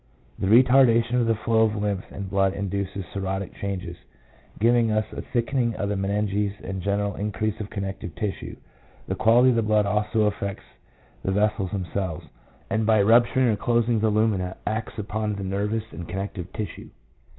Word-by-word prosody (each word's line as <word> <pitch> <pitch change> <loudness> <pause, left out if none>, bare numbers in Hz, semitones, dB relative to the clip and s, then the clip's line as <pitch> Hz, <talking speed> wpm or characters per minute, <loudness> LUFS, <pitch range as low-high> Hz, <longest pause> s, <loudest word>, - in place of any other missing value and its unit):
1 95 - 0
The 120 +4 +8
retarda 125 -3 +5
tion 125 +2 -1
of 115 - +1
the 115 - +3
flow 110 +1 +1
of 110 -1 +3
lymph 105 -2 -2
and 100 -1 -6
blood 95 0 +1
induces 100 -1 -3
cirrhotic 95 0 -3
changes, 95 -3 -5 0.6
giving 115 +1 +3
us 110 0 +1
a - - -5
thickening 120 -1 -1
of 100 - -2
the 105 - 0
meninges 100 +1 0
and 95 -1 -4
a - - -10
general 100 +1 0
increase 105 +1 -2
of 105 -1 -5
connective 95 -4 -5
tissue. 105 -3 -4 0.5
The - - -1
quality 120 +3 +5
of 120 - +1
the - - +3
blood 105 -1 +2
also 105 +2 +1
affects 100 -1 -1 0.6
the 95 - 0
vessels 105 -1 +1
themselves, 95 -3 -3 0.4
and 110 +4 0
by 110 0 +4
rupturing 120 +4 +4
or 110 - +2
closing 120 +1 +1
the 110 +1 +2
lumina 105 -4 0
acts 110 +1 -3
upon 105 0 -2
the 100 - -5
nervous 105 +3 -1
and 85 -3 -8
connective 95 -1 -5
tissue. 105 - -6
105 Hz, 180 wpm, -25 LUFS, 100-110 Hz, 0.6 s, The